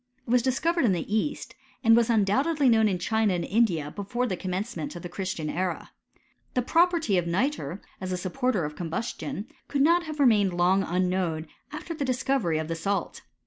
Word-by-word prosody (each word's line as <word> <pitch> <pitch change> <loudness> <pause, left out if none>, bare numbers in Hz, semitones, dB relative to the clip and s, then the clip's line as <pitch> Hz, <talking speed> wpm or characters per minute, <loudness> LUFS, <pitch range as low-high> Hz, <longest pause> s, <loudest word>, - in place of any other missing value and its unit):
It 230 - -5
was 250 0 +5
discovered 330 +7 +1
in 215 -6 +4
the 180 +4 -2
east; 290 +7 -2 0.3
and 225 -1 +6
was 235 0 +3
undoubtedly 265 +8 +2
known 220 -2 +4
in 185 - 0
China 220 +1 +1
and 170 -1 -2
India 180 -9 +1
before 215 +5 -2
the 195 - -1
commencement 185 -2 -4
of 175 - -8
the 175 - -5
Christian 180 -4 -4
era. 180 +3 -3 0.6
The 250 - +2
property 330 - +3
of 170 - -3
nitre, 200 - -1 0.2
as 185 0 -4
a 180 - -1
supporter 200 - -1
of 150 0 -6
combustion, 205 - -4 0.2
could 275 -1 +1
not 340 +3 +4
have 310 -1 -6
remained 210 -8 +4
long 185 +2 +3
unknown 180 -3 -1 0.3
after 310 +3 -6
the 305 - -3
dis 255 -2 -1
covery 235 - +1
of 155 - -3
the 165 - -2
salt. 195 +5 -2
205 Hz, 190 wpm, -27 LUFS, 180-255 Hz, 0.6 s, and